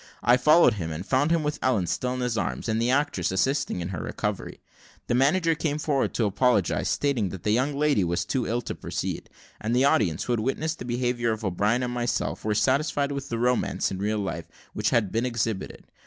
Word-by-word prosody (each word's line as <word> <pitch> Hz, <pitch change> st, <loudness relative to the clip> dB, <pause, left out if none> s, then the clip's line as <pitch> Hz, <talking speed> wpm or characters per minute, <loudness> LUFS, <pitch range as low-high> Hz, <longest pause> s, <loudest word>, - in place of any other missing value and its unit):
I 120 Hz, -, +6 dB
followed 150 Hz, +5 st, +5 dB
him, 85 Hz, -6 st, -4 dB
and 80 Hz, +4 st, -5 dB
found 135 Hz, +7 st, +2 dB
him 165 Hz, -1 st, +2 dB
with 150 Hz, 0 st, -2 dB
Ellen 120 Hz, -8 st, +2 dB
still 125 Hz, +8 st, -2 dB
in 125 Hz, -, -3 dB
his 125 Hz, -2 st, -1 dB
arms, 110 Hz, -, -2 dB
and 110 Hz, 0 st, 0 dB
the 120 Hz, -, +1 dB
actresses 125 Hz, -, +1 dB
assisting 135 Hz, 0 st, 0 dB
in 85 Hz, -, -4 dB
her 90 Hz, -4 st, -4 dB
recovery. -, -, -4 dB, 0.5 s
The -, -, -1 dB
manager 165 Hz, +7 st, +3 dB
came 150 Hz, -2 st, -1 dB
forward 145 Hz, -3 st, 0 dB
to 115 Hz, -, +1 dB
apologise, 105 Hz, -1 st, +1 dB
stating 130 Hz, -9 st, 0 dB
that 95 Hz, -2 st, -8 dB
the 105 Hz, -, +1 dB
young 130 Hz, +6 st, +1 dB
lady 145 Hz, -8 st, +2 dB
was 85 Hz, 0 st, -1 dB
too 130 Hz, -4 st, -1 dB
ill 120 Hz, +2 st, 0 dB
to -, -, -4 dB
proceed, -, -, -4 dB, 0.3 s
and 115 Hz, +3 st, -1 dB
the 130 Hz, +2 st, +4 dB
audience, 105 Hz, -, +2 dB
who 125 Hz, -, -1 dB
had 120 Hz, -, 0 dB
witnessed 155 Hz, +7 st, -2 dB
the -, -, -6 dB
behaviour 120 Hz, -1 st, 0 dB
of 110 Hz, 0 st, -6 dB
O'Brien 105 Hz, +6 st, +1 dB
and 125 Hz, 0 st, -2 dB
myself, 120 Hz, -1 st, -2 dB
were 105 Hz, -1 st, 0 dB
satisfied 140 Hz, +3 st, +1 dB
with 140 Hz, 0 st, -5 dB
the 115 Hz, -, -2 dB
romance 125 Hz, +2 st, 0 dB
in 95 Hz, -, -4 dB
real 105 Hz, +2 st, 0 dB
life 95 Hz, -5 st, -4 dB, 0.3 s
which -, -, 0 dB
had 105 Hz, -6 st, +1 dB
been 115 Hz, +3 st, 0 dB
exhibited. 115 Hz, -4 st, -3 dB
120 Hz, 220 wpm, -26 LUFS, 105-140 Hz, 0.5 s, I